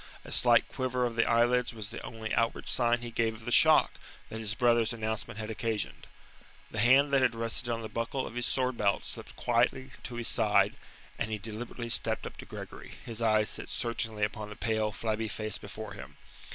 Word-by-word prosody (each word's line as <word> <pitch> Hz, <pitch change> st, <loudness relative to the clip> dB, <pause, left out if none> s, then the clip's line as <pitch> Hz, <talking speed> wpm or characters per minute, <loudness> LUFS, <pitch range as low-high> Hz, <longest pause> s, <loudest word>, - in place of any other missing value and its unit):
A -, -, -9 dB
slight -, -, +5 dB
quiver 125 Hz, -1 st, -1 dB
of 120 Hz, -1 st, -3 dB
the 115 Hz, -, +2 dB
eyelids 120 Hz, +1 st, +2 dB
was 110 Hz, -1 st, -6 dB
the 120 Hz, -, -6 dB
only 110 Hz, -1 st, -5 dB
outward 115 Hz, 0 st, 0 dB
sign 120 Hz, -1 st, +2 dB
he 120 Hz, -1 st, -6 dB
gave 115 Hz, -1 st, 0 dB
of 110 Hz, +1 st, -13 dB
the 120 Hz, -, -3 dB
shock -, -, +6 dB, 0.4 s
that 110 Hz, -, -6 dB
his 110 Hz, -1 st, -2 dB
brother's 120 Hz, -1 st, +3 dB
announcement 110 Hz, -1 st, -4 dB
had 110 Hz, 0 st, -4 dB
occasioned. 110 Hz, -1 st, -3 dB, 0.6 s
The 110 Hz, -, -3 dB
hand 135 Hz, +5 st, +5 dB
that 135 Hz, -, +5 dB
had 125 Hz, -3 st, +2 dB
rested 115 Hz, +1 st, -1 dB
on 115 Hz, -1 st, -2 dB
the -, -, -4 dB
buckle 115 Hz, +4 st, -3 dB
of -, -, -8 dB
his 120 Hz, 0 st, 0 dB
sword 130 Hz, -2 st, 0 dB
belt 100 Hz, -1 st, +1 dB
slipped -, -, -3 dB
quietly 125 Hz, +2 st, +1 dB
to 120 Hz, -, -6 dB
his 120 Hz, -1 st, 0 dB
side, 105 Hz, -3 st, +3 dB, 0.5 s
and -, -, -1 dB
he 110 Hz, -, -2 dB
deliberately 115 Hz, +3 st, -6 dB
stepped -, -, +3 dB
up -, -, -8 dB
to -, -, -9 dB
Gregory, -, -, -9 dB
his 115 Hz, -1 st, -6 dB
eyes 110 Hz, -1 st, +3 dB
set -, -, -5 dB
searchingly 115 Hz, -3 st, -2 dB
upon 105 Hz, 0 st, -2 dB
the 105 Hz, -, -8 dB
pale, 110 Hz, -1 st, 0 dB
flabby 110 Hz, +1 st, -2 dB
face 110 Hz, +1 st, -3 dB
before 105 Hz, 0 st, -8 dB
him. 65 Hz, 0 st, -11 dB
115 Hz, 205 wpm, -30 LUFS, 110-120 Hz, 0.6 s, shock